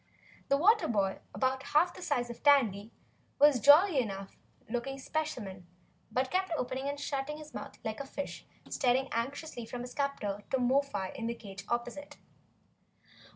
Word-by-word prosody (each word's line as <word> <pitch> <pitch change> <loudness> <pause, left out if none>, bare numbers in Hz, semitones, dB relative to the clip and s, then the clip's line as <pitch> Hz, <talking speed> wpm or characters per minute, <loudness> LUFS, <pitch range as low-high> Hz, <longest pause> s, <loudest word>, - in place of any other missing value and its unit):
The 275 - +4
water 425 +8 +5
boy, 200 -4 0
about 260 0 0
half 310 +5 +2
the - - -11
size 245 -7 -1
of 235 - -11
Tandy, 230 -8 +4 0.5
was 290 -2 +6
a - - -6
jolly 300 - +7
enough 195 -5 -4 0.3
looking 245 +4 -3
specimen, 240 - -4 0.4
but 260 +1 0
kept 375 0 0
opening 260 +2 -2
and 285 0 -4
shutting 285 +1 -3
his 305 0 -11
mouth - - -7
like 220 -1 -3
a 280 - -5
fish 285 +1 -5 0.2
and - - -9
staring 260 +2 +2
anxiously 255 +2 -3
from 240 +2 -6
his 245 0 -7
captor 210 -8 -2
to 265 - +2
Mo 255 +2 +3
fi 200 -9 -4
in 230 - -4
the 235 - -2
cage 195 -4 -9
opposite. 245 +4 -3
260 Hz, 170 wpm, -31 LUFS, 230-285 Hz, 0.5 s, jolly